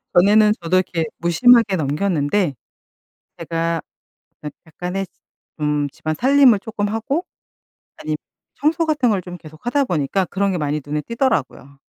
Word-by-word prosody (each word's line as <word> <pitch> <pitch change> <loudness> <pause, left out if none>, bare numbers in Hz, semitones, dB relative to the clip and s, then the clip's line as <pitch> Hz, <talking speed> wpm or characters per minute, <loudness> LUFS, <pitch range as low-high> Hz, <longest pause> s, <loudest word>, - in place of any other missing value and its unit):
전에는 210 +4 +5
저도 170 +2 +1
이렇게 170 -3 -1
무심하게 220 +4 +4
넘겼는데 155 +1 0 0.8
제가 165 0 -2 0.6
약 150 - -4 0.2
약간의 180 +4 -4 0.5
좀 150 -1 0
집안 155 +2 -4
살림을 260 - +5
쪼끔 205 -1 -3
하고 270 - -2 0.7
아님 155 - -3 0.4
청소 320 +3 +1
같은 295 -6 +1
걸 195 -3 0
좀 180 0 -9
계속 155 +3 -15
하다 275 +3 +1
보니까 175 - 0
그런 195 +2 -1
게 180 - -1
많이 150 0 -1
눈에 150 +1 -2
띄더라고요. 145 - -2
185 Hz, 295 characters per minute, -20 LUFS, 155-225 Hz, 0.8 s, 전에는